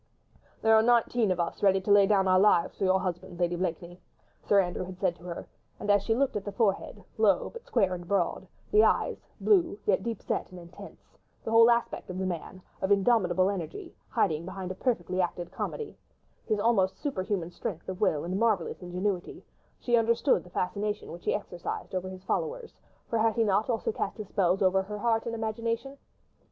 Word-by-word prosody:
"There 220 Hz, 0 st, +6 dB
are 220 Hz, -, +6 dB
nineteen 235 Hz, -1 st, +3 dB
of 180 Hz, -1 st, 0 dB
us 170 Hz, -, -2 dB
ready 195 Hz, -1 st, +4 dB
to 205 Hz, -, -1 dB
lay 200 Hz, -1 st, +7 dB
down 195 Hz, -2 st, +3 dB
our 185 Hz, 0 st, +5 dB
lives 190 Hz, -4 st, +3 dB
for 195 Hz, -, -1 dB
your 190 Hz, 0 st, +3 dB
husband, 180 Hz, -1 st, -5 dB
Lady 175 Hz, 0 st, +1 dB
Blakeney," 175 Hz, 0 st, -4 dB, 0.4 s
Sir 200 Hz, -, +3 dB
Andrew 180 Hz, -1 st, -1 dB
had 185 Hz, 0 st, -8 dB
said 185 Hz, -2 st, 0 dB
to -, -, -18 dB
her; 170 Hz, -1 st, -6 dB, 0.3 s
and 205 Hz, -, 0 dB
as 205 Hz, -1 st, +4 dB
she 225 Hz, +3 st, 0 dB
looked 275 Hz, +2 st, +1 dB
at 205 Hz, -, -2 dB
the 205 Hz, -, -5 dB
forehead, 205 Hz, -2 st, -1 dB, 0.2 s
low, 200 Hz, -4 st, +3 dB
but 470 Hz, +1 st, -11 dB
square 195 Hz, -, +2 dB
and 175 Hz, -1 st, -7 dB
broad, 200 Hz, +1 st, 0 dB, 0.2 s
the 425 Hz, 0 st, +6 dB
eyes, -, -, +1 dB, 0.2 s
blue, 350 Hz, -, +3 dB
yet 190 Hz, -2 st, +2 dB
deep 230 Hz, 0 st, -4 dB
set -, -, -2 dB
and 180 Hz, -, -10 dB
intense, 170 Hz, +1 st, -14 dB, 0.2 s
the 225 Hz, -, -4 dB
whole 230 Hz, +1 st, +7 dB
aspect 235 Hz, -4 st, 0 dB
of 180 Hz, -, -5 dB
the 190 Hz, -, -2 dB
man, 185 Hz, +1 st, -5 dB, 0.2 s
of 190 Hz, -, 0 dB
indomitable 195 Hz, -3 st, +3 dB
energy, 180 Hz, -6 st, -5 dB, 0.2 s
hiding, 155 Hz, 0 st, +1 dB
behind 185 Hz, +1 st, -6 dB
a -, -, -2 dB
perfectly 185 Hz, -4 st, -1 dB
acted 175 Hz, -1 st, -3 dB
comedy, 450 Hz, -3 st, -5 dB, 0.5 s
his 215 Hz, -, +1 dB
almost 200 Hz, -4 st, +2 dB
superhuman 185 Hz, -, -3 dB
strength 175 Hz, -1 st, -6 dB
of 185 Hz, 0 st, -6 dB
will 155 Hz, -8 st, +2 dB
and 185 Hz, +3 st, -2 dB
marvellous 215 Hz, -8 st, 0 dB
ingenuity, 180 Hz, +1 st, -3 dB, 0.4 s
she 240 Hz, -, +1 dB
understood 235 Hz, +4 st, +2 dB
the 180 Hz, -, -15 dB
fascination 205 Hz, +4 st, -3 dB
which 170 Hz, +1 st, -10 dB
he -, -, +2 dB
exercised 175 Hz, -4 st, -5 dB
over 185 Hz, 0 st, -2 dB
his 185 Hz, 0 st, -10 dB
followers, 475 Hz, -, -3 dB, 0.3 s
for 230 Hz, -, -1 dB
had 225 Hz, 0 st, +2 dB
he 230 Hz, -, +3 dB
not 210 Hz, +2 st, +1 dB
also 225 Hz, -2 st, 0 dB
cast 200 Hz, -, -3 dB
his 215 Hz, -3 st, -7 dB
spells 185 Hz, 0 st, +1 dB
over 190 Hz, 0 st, +3 dB
her 210 Hz, +2 st, -6 dB
heart 225 Hz, +1 st, +1 dB
and 230 Hz, -, -3 dB
her -, -, -5 dB
imagination? 230 Hz, +4 st, -3 dB
195 Hz, 205 wpm, -28 LUFS, 180-225 Hz, 0.5 s, lay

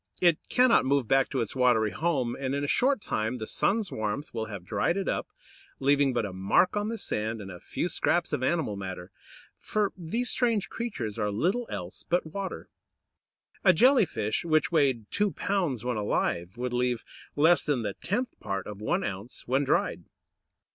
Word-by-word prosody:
It 170 Hz, -3 st, +4 dB
cannot 250 Hz, -1 st, +5 dB
move 135 Hz, -2 st, +1 dB
back 135 Hz, +1 st, +3 dB
to 130 Hz, -, -1 dB
its 115 Hz, -, -3 dB
watery 120 Hz, -4 st, +3 dB
home, 130 Hz, -, 0 dB
and 135 Hz, 0 st, -2 dB
in 140 Hz, -, -1 dB
a -, -, -1 dB
short 260 Hz, -, +2 dB
time 110 Hz, -, -2 dB
the 110 Hz, -, -5 dB
sun's 210 Hz, -, 0 dB
warmth 110 Hz, +7 st, -3 dB
will 110 Hz, -1 st, -2 dB
have 100 Hz, -5 st, -8 dB
dried 105 Hz, -, 0 dB
it 195 Hz, -, -2 dB
up, -, -, -1 dB, 0.5 s
leaving 140 Hz, 0 st, +3 dB
but 120 Hz, -3 st, 0 dB
a 100 Hz, -, -6 dB
mark 95 Hz, -, +2 dB
on 205 Hz, 0 st, 0 dB
the 230 Hz, +1 st, -3 dB
sand, 110 Hz, -, -3 dB
and 95 Hz, -2 st, -7 dB
a 90 Hz, -, -9 dB
few -, -, -3 dB
scraps -, -, 0 dB
of -, -, 0 dB
animal 135 Hz, -5 st, 0 dB
matter; 95 Hz, -1 st, -6 dB, 0.5 s
for 210 Hz, -2 st, 0 dB
these 205 Hz, +8 st, -2 dB
strange 230 Hz, -6 st, +1 dB
creatures 115 Hz, -, -4 dB
are 105 Hz, -1 st, +1 dB
little 185 Hz, -, 0 dB
else 90 Hz, -2 st, -6 dB
but 175 Hz, 0 st, +2 dB
water. 195 Hz, +4 st, -5 dB, 1.0 s
A -, -, +7 dB
Jelly 255 Hz, -5 st, +5 dB
fish, 110 Hz, -4 st, -2 dB
which 155 Hz, -1 st, +2 dB
weighed 135 Hz, -9 st, +2 dB
two 205 Hz, -1 st, +1 dB
pounds 170 Hz, -, -1 dB
when 125 Hz, -2 st, -1 dB
alive, 95 Hz, -2 st, -1 dB
would 125 Hz, 0 st, -3 dB
leave 125 Hz, -1 st, 0 dB, 0.3 s
less 160 Hz, +4 st, +5 dB
than 135 Hz, -6 st, 0 dB
the 100 Hz, -2 st, -2 dB
tenth 240 Hz, -, -3 dB
part 95 Hz, -1 st, -3 dB
of 105 Hz, -1 st, -8 dB
one 110 Hz, -, 0 dB
ounce 100 Hz, +4 st, -6 dB
when 135 Hz, +3 st, +2 dB
dried! 135 Hz, -, 0 dB
130 Hz, 190 wpm, -28 LUFS, 110-180 Hz, 1.0 s, A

